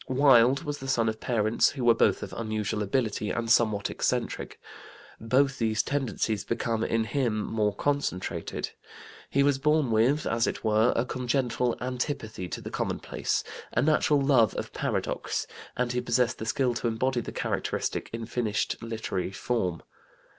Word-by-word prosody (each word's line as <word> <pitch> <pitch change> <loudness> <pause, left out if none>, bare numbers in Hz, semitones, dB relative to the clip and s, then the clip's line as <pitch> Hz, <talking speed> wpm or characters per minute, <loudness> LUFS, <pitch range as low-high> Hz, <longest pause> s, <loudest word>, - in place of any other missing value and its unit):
Wilde 130 -1 +5
was 145 -1 -4
the 135 - -7
son 120 -4 +2
of 110 0 -4
parents 110 -3 +2
who 130 -4 -4
were 120 - +7
both 115 - +2
of - - -7
unusual 110 -2 -2
ability 105 0 -1
and 115 +4 -2
somewhat 110 -4 +3
eccentric. - - -2 0.6
Both 130 +4 +2
these 110 -2 +1
tendencies 115 -6 -1
became 115 -1 -1
in 115 0 +1
him 110 -3 0
more 105 -2 0
concentrated. 140 -11 -2 0.6
He 140 - +3
was 140 -1 +2
born 150 -3 +2
with, 125 +8 +3
as 115 0 +1
it - - -3
were, 110 +1 +3
a 115 - +1
congenital 125 -1 0
antipathy 120 - -3
to - - -5
the - - -7
commonplace, - - -2 0.3
a 120 - +2
natural 150 -1 +3
love 130 -5 +4
of - - -5
paradox, - - -2 0.3
and 125 -1 0
he 125 0 0
possessed 120 0 +1
the 110 - -5
skill 125 0 +1
to 120 - -2
embody 120 +2 0
the - - -6
characteristic - - -2
in 115 0 -4
finished 115 -2 -1
literary 110 -5 -3
form. 95 -6 -2
120 Hz, 160 wpm, -28 LUFS, 110-130 Hz, 0.6 s, were